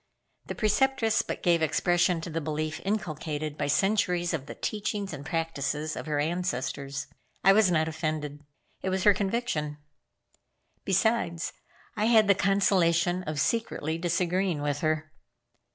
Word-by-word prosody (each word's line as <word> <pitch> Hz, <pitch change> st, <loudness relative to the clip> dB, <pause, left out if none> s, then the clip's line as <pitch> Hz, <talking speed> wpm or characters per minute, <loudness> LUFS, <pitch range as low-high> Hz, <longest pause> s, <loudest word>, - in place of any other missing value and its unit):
The -, -, -4 dB
Preceptress 225 Hz, +1 st, +2 dB
but -, -, -6 dB
gave 170 Hz, -2 st, +3 dB
expression 175 Hz, +2 st, +2 dB
to 165 Hz, -, -6 dB
the 165 Hz, +1 st, -2 dB
belief 155 Hz, +1 st, -3 dB
inculcated 155 Hz, -7 st, -3 dB
by 145 Hz, -1 st, -2 dB
centuries 180 Hz, 0 st, +1 dB
of 140 Hz, -4 st, -3 dB
the -, -, -7 dB
teachings 205 Hz, -2 st, -3 dB
and 140 Hz, -1 st, -7 dB
practices 155 Hz, -1 st, -2 dB
of -, -, -6 dB
her 150 Hz, -1 st, 0 dB
ancestors. 145 Hz, -4 st, -2 dB, 0.4 s
I 195 Hz, -, +7 dB
was 210 Hz, -2 st, +5 dB
not 160 Hz, -2 st, +2 dB
offended. 155 Hz, -2 st, -3 dB, 0.4 s
It 190 Hz, -, -1 dB
was 190 Hz, 0 st, -1 dB
her 205 Hz, -, +7 dB
conviction. 190 Hz, -8 st, -2 dB, 1.1 s
Besides, 190 Hz, -4 st, +1 dB, 0.4 s
I 215 Hz, 0 st, 0 dB
had 220 Hz, -2 st, +5 dB
the 200 Hz, -, +7 dB
consolation 185 Hz, -3 st, +2 dB
of 155 Hz, -1 st, -3 dB
secretly 165 Hz, -5 st, -1 dB
disagreeing 175 Hz, -1 st, 0 dB
with 145 Hz, -1 st, -1 dB
her. 155 Hz, 0 st, -1 dB
170 Hz, 140 wpm, -28 LUFS, 155-195 Hz, 1.1 s, I